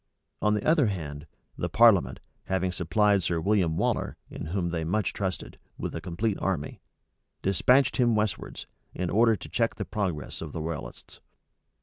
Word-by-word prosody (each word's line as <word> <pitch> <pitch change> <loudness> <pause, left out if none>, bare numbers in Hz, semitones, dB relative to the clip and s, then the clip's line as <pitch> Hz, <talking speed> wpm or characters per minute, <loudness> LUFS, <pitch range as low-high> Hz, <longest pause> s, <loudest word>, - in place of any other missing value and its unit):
On 105 0 +3
the 105 - -2
other 155 -5 +4
hand, 75 -6 -5 0.3
the - - -3
parliament, 100 - +4 0.2
having 95 0 0
supplied 100 +4 +2
Sir 85 -1 0
William 90 -3 +1
Waller, - - -1
in - - -6
whom 85 +1 -1
they 85 -1 -2
much 95 +6 0
trusted, 95 -2 -4 0.2
with - - -4
a - - -4
complete 95 +4 -2
army, 90 -7 -2 0.6
despatched 125 +7 +3
him 120 -3 +3
westwards, 105 -2 -2 0.3
in 90 -1 -2
order 115 +2 +4
to - - -9
check 115 -2 0
the 100 - -4
progress 90 -8 -3
of 80 -3 -6
the 80 - -4
royalists. 80 -2 -7
95 Hz, 160 wpm, -27 LUFS, 85-105 Hz, 0.6 s, other